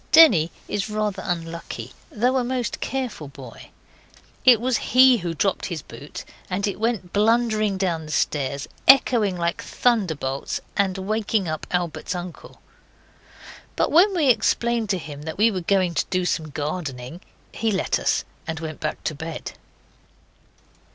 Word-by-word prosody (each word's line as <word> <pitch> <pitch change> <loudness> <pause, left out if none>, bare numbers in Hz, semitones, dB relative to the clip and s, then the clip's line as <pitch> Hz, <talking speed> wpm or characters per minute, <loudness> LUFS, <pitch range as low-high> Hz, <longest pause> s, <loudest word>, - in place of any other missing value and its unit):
Denny 220 - +7 0.2
is 205 0 -2
rather 210 -2 -2
unlucky, 165 -8 -5 0.2
though 250 +4 +1
a 255 - +1
most 250 -1 -2
careful 255 - -3
boy. 135 -4 -12 0.7
It 250 -4 +7
was 250 0 +1 0.2
he 260 -1 +8
who 170 -2 -3
dropped 190 +4 0
his 170 -4 -5
boot, 145 - -9 0.2
and 195 +2 -1
it 200 -1 -3
went 220 -6 -1
blundering 215 -1 +2
down 170 -5 -1
the - - -7
stairs, 140 -2 -1 0.2
echoing 235 -8 +5
like 170 0 -1
thunderbolts, 160 - -1 0.2
and 195 -1 +1
waking 210 0 -1
up 155 -1 -4
Albert's 175 0 -2
uncle. 175 -1 -8 1.1
But - - +1
when 370 +5 +5
we 305 -6 +3
explained 235 -1 +2
to 195 - +1
him 150 -4 -8
that 160 +1 -6
we 225 +3 +4
were 185 -3 -3
going 185 -1 +1
to - - 0
do 185 -1 0
some 160 -3 -1
gardening 145 0 -5 0.3
he 225 0 -1
let 195 - 0
us, - - +1 0.2
and 160 -1 -3
went 160 -1 -6
back - - -4
to - - -1
bed. 160 +2 -6
190 Hz, 150 wpm, -23 LUFS, 160-225 Hz, 1.1 s, he